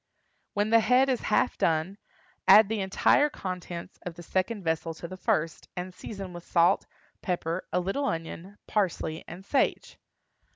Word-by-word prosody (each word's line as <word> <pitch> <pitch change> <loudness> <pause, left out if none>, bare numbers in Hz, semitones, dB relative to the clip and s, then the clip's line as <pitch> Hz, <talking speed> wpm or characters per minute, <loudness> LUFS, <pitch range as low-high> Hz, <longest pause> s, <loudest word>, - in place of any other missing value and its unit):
When 205 +1 +1
the 230 - +7
head 250 +4 +4
is 255 -3 +1
half - - +1
done, 165 +5 +1 0.5
add 215 -1 +8
the 220 -1 -1
entire 195 +9 +3
contents 180 -7 -6
of 175 -2 -7
the 175 - -10
second 190 +4 -1
vessel 165 0 -1
to 170 - -7
the 185 - -8
first, 165 -3 -1
and 180 +1 -4
season 195 -2 -7
with 175 -1 -8
salt, 175 +3 +3 0.3
pepper, 175 -1 -2
a - - +2
little 195 +11 -1
onion, 165 +2 -4
parsley, 180 -6 -1
and 180 +3 -9
sage. 270 +5 0
185 Hz, 160 wpm, -28 LUFS, 170-210 Hz, 0.5 s, add